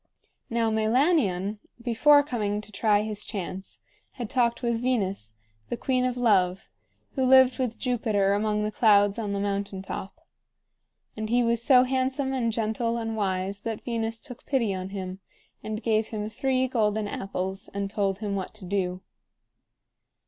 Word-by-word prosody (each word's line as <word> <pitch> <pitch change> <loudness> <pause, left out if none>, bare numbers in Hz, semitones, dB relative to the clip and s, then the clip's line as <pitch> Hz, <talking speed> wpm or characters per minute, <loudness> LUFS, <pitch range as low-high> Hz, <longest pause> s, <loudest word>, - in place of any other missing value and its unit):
Now 230 -1 +1
Meilanion, 220 - +2 0.2
before 285 +5 +5
coming 210 -7 -2
to 215 - -13
try 210 0 +2
his 215 -1 -4
chance, 190 -2 -6 0.3
had 240 -5 -6
talked 240 -2 +1
with 235 -1 0
Venus, 195 - -1 0.3
the 240 - -2
queen 255 0 +1
of 250 -1 -1
love, 190 -6 +2 0.4
who 265 - -1
lived 260 0 +6
with 245 -3 -1
Jupiter 215 -6 +1
among 210 0 0
the 210 - -1
clouds 205 -1 +4
on 210 -3 -2
the 200 - -1
mountain 200 -1 -2
top. 200 +11 -7 0.9
And 215 0 -4
he 245 +1 +3
was 230 -1 +1
so 250 +1 +6
handsome 265 +1 0
and 235 -3 0
gentle 230 +1 -1
and 225 -1 -3
wise 195 -1 -2
that 225 -1 -5
Venus 225 -1 -2
took 255 -2 -11
pity 235 -8 +1
on 185 0 -4
him, 190 -1 -6 0.4
and 215 +1 -5
gave 220 -1 +2
him 215 -1 -4
three 260 +3 +1
golden 215 -4 0
apples 190 -1 -4
and 200 0 -2
told 195 -1 -1
him 205 -1 -3
what 190 +2 -5
to 210 -3 -10
do. 185 -1 -2
220 Hz, 160 wpm, -26 LUFS, 200-245 Hz, 0.9 s, lived